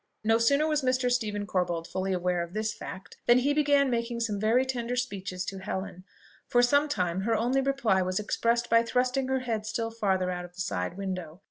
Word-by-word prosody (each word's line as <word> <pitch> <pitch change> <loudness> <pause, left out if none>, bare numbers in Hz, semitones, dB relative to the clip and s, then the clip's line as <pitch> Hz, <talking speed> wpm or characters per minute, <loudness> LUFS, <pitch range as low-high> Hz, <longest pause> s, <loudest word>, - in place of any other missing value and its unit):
No 225 +1 +3
sooner 280 +6 +3
was 305 -1 +1
Mr. 255 -1 +1
Stephen 210 -4 -1
Corbold 175 -4 -1
fully 190 +2 -3
aware 180 -1 0
of 170 +1 -6
this 215 0 -1
fact, 190 -2 -9
than 240 - +7
he 275 +3 +2
began 285 -2 +3
making 235 0 -1
some 210 -3 -1
very 230 +5 +3
tender 245 -2 -2
speeches 195 -7 -3
to 195 - -5
Helen. 190 -1 -5 0.4
For 245 0 +3
some 285 +4 +3
time 180 -8 -1
her 225 +3 +1
only 250 +4 +1
reply 270 -8 +1
was 185 +1 -1
expressed 235 +3 0
by 230 0 +5
thrusting 250 +3 0
her 265 0 0
head 225 -4 -3
still 225 +1 -2
farther 190 -5 0
out 180 0 -4
of 175 0 -12
the 185 - -5
side 90 - -3
window. 185 -4 -5
225 Hz, 210 wpm, -28 LUFS, 185-250 Hz, 0.4 s, than